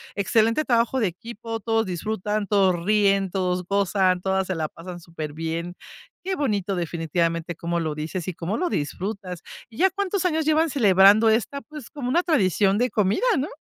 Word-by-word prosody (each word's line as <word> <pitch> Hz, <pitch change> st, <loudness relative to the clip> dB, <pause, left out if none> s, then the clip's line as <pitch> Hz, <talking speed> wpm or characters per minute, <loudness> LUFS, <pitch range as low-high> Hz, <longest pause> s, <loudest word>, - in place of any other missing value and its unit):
excelente 225 Hz, +7 st, +2 dB
trabajo 235 Hz, +1 st, +2 dB
de 215 Hz, -, +2 dB
equipo, 225 Hz, +5 st, -7 dB
todos 225 Hz, +1 st, 0 dB
disfrutan, 210 Hz, +3 st, -3 dB
todos 190 Hz, -4 st, +2 dB
ríen, 200 Hz, -2 st, +3 dB
todos 180 Hz, -1 st, -1 dB
gozan, 190 Hz, -1 st, +1 dB
todas 190 Hz, 0 st, 0 dB
se 185 Hz, -, -2 dB
la 155 Hz, -2 st, -2 dB
pasan 175 Hz, +1 st, -9 dB
súper 160 Hz, -3 st, -7 dB
bien. 165 Hz, +2 st, -4 dB, 0.5 s
Qué 380 Hz, +1 st, -2 dB
bonito, 205 Hz, -, -1 dB
definitivamente, 170 Hz, 0 st, -2 dB
cómo 170 Hz, +1 st, -2 dB
lo 155 Hz, -2 st, -2 dB
dices 160 Hz, +3 st, -5 dB
y 185 Hz, -, -2 dB
cómo 175 Hz, +6 st, -3 dB
lo 360 Hz, 0 st, -1 dB
disfrutas. 180 Hz, -, -4 dB, 0.3 s
¿Y 225 Hz, -, -15 dB
ya 380 Hz, +3 st, +4 dB
cuántos 395 Hz, -1 st, -2 dB
años 320 Hz, -3 st, +1 dB
llevan 315 Hz, +1 st, +3 dB
celebrando 210 Hz, -3 st, +5 dB
esta, 230 Hz, +6 st, 0 dB
pues, 300 Hz, -5 st, -11 dB
como 270 Hz, -4 st, -5 dB
una 345 Hz, +7 st, +2 dB
tradición 200 Hz, -, +2 dB
de 250 Hz, +3 st, +1 dB
comida, 210 Hz, -, +1 dB
no? 270 Hz, -, -1 dB
200 Hz, 175 wpm, -24 LUFS, 175-235 Hz, 0.5 s, celebrando